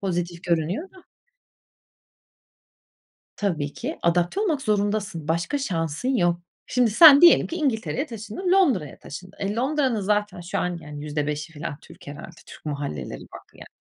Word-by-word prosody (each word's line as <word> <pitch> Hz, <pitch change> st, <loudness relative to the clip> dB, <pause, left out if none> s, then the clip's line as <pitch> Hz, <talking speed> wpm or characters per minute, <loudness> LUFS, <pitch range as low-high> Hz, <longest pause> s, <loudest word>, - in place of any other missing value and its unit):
pozitif 175 Hz, -2 st, -3 dB
görünüyor 175 Hz, -, -1 dB
da. 375 Hz, -1 st, -17 dB, 2.3 s
Tabii 160 Hz, -8 st, -2 dB
ki 295 Hz, +7 st, -5 dB
adapte 175 Hz, -, +1 dB
olmak 315 Hz, -10 st, 0 dB
zorundasın, 205 Hz, -5 st, -1 dB
başka 170 Hz, -, 0 dB
şansın 165 Hz, -, -2 dB
yok. 175 Hz, -4 st, +1 dB, 0.3 s
Şimdi 250 Hz, -3 st, +2 dB
sen 285 Hz, +5 st, +9 dB
diyelim 345 Hz, -1 st, +7 dB
ki 335 Hz, -, -5 dB
İngiltere'ye 270 Hz, -2 st, -1 dB
taşındın, 230 Hz, -, -4 dB
Londra'ya 265 Hz, -, +2 dB
taşındın. 185 Hz, +7 st, -10 dB
E, 200 Hz, +1 st, -2 dB
Londra'nın 260 Hz, -1 st, 0 dB
zaten 205 Hz, -1 st, -1 dB
şu 175 Hz, +1 st, -4 dB
an 180 Hz, -1 st, -1 dB, 0.2 s
%5'i 150 Hz, +1 st, -3 dB
f 150 Hz, -, -12 dB
alan 145 Hz, -, -6 dB
Türk -, -, -16 dB
herhâlde, 145 Hz, +3 st, -8 dB, 0.2 s
Türk -, -, -13 dB
mahalleleri 145 Hz, -, -5 dB
var -, -, -12 dB
yani. -, -, -12 dB
200 Hz, 145 wpm, -24 LUFS, 165-260 Hz, 2.3 s, sen